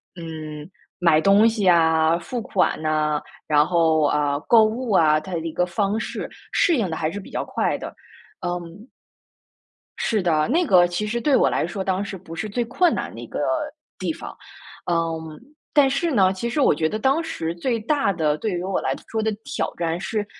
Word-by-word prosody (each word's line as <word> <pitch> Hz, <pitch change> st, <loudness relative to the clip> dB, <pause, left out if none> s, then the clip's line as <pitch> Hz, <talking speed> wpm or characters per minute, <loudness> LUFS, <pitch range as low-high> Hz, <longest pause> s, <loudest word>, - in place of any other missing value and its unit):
嗯， 155 Hz, -2 st, -8 dB, 0.3 s
买 170 Hz, -3 st, +4 dB
东 200 Hz, +6 st, +5 dB
西 215 Hz, -4 st, -1 dB
啊， 160 Hz, -1 st, +4 dB
付 245 Hz, +7 st, -5 dB
款 200 Hz, -4 st, 0 dB
呐， 155 Hz, -1 st, +1 dB, 0.3 s
然 150 Hz, -1 st, +4 dB
后， 160 Hz, -2 st, +2 dB
啊， 145 Hz, -1 st, +1 dB
购 230 Hz, -2 st, +7 dB
物 225 Hz, +2 st, -1 dB
啊， 155 Hz, -5 st, +4 dB
它 190 Hz, -, -10 dB
的 170 Hz, -, -1 dB
一 165 Hz, 0 st, -4 dB
个 180 Hz, +3 st, 0 dB
方 200 Hz, +3 st, -1 dB
式 -, -, -5 dB, 0.2 s
适 340 Hz, -, +3 dB
应 220 Hz, -6 st, 0 dB
得 -, -, -2 dB
还 155 Hz, -1 st, -1 dB
是 205 Hz, -, -5 dB
比 195 Hz, -, -12 dB
较 -, -, -2 dB
快 -, -, -1 dB
的。 -, -, -6 dB, 0.5 s
嗯 175 Hz, +6 st, -6 dB, 1.1 s
是 215 Hz, -3 st, 0 dB
的， 160 Hz, -4 st, +2 dB
那 335 Hz, +8 st, +2 dB
个 180 Hz, -, +5 dB
其 175 Hz, +4 st, -3 dB
实 235 Hz, +3 st, -2 dB
对 285 Hz, +2 st, +3 dB
我 -, -, +4 dB
来 -, -, 0 dB
说 190 Hz, +3 st, -4 dB
当 190 Hz, +1 st, -1 dB
时 200 Hz, -1 st, -6 dB
不 165 Hz, -2 st, -10 dB
是 210 Hz, +6 st, -4 dB
最 240 Hz, +4 st, -1 dB
困 340 Hz, +9 st, +2 dB
难 -, -, -4 dB
的 -, -, -9 dB
一 -, -, -8 dB
个 -, -, -5 dB, 0.6 s
地 185 Hz, -3 st, -1 dB
方。 -, -, -8 dB, 0.5 s
嗯， 165 Hz, -2 st, -2 dB, 0.3 s
但 285 Hz, -2 st, +5 dB
是 330 Hz, +5 st, 0 dB
呢， 190 Hz, -7 st, +3 dB
其 215 Hz, +5 st, -3 dB
实 270 Hz, -, -2 dB
我 -, -, +5 dB
觉 155 Hz, +1 st, 0 dB
得 215 Hz, -, -2 dB
当 270 Hz, +8 st, +2 dB
时 165 Hz, -, -4 dB
最 230 Hz, +6 st, -1 dB
大 275 Hz, -1 st, +1 dB
的- 155 Hz, -5 st, 0 dB
对 220 Hz, -, -2 dB
于 175 Hz, -1 st, -3 dB
我 190 Hz, 0 st, -1 dB
来 -, -, -1 dB
说 220 Hz, -, -2 dB
的- 220 Hz, 0 st, 0 dB
挑 285 Hz, +1 st, -2 dB
战 170 Hz, 0 st, -2 dB
是 210 Hz, +2 st, -2 dB
185 Hz, 220 characters per minute, -23 LUFS, 160-220 Hz, 1.1 s, 购